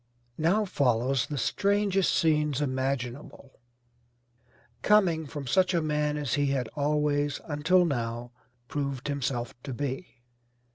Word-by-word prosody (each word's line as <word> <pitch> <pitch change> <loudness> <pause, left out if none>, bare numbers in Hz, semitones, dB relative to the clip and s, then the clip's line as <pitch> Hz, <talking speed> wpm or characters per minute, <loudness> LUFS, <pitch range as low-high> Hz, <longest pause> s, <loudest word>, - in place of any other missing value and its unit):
Now 190 +7 +2
follows 130 - +1
the 145 - -4
strangest 200 - +1
scenes 150 -3 +2
imaginable, 130 -1 -3 1.2
coming 175 -7 +3
from 145 -1 -6
such 185 +8 +2
a 170 - +2
man 150 -1 0
as 145 -5 -2
he 145 0 +2
had 135 -3 0
always, 145 -1 0
until 165 +5 +3
now, 120 -4 -3 0.4
proved 140 -3 -3
himself 130 -4 -2
to 130 -1 -6
be. 125 -3 -5
145 Hz, 115 wpm, -28 LUFS, 130-155 Hz, 1.2 s, coming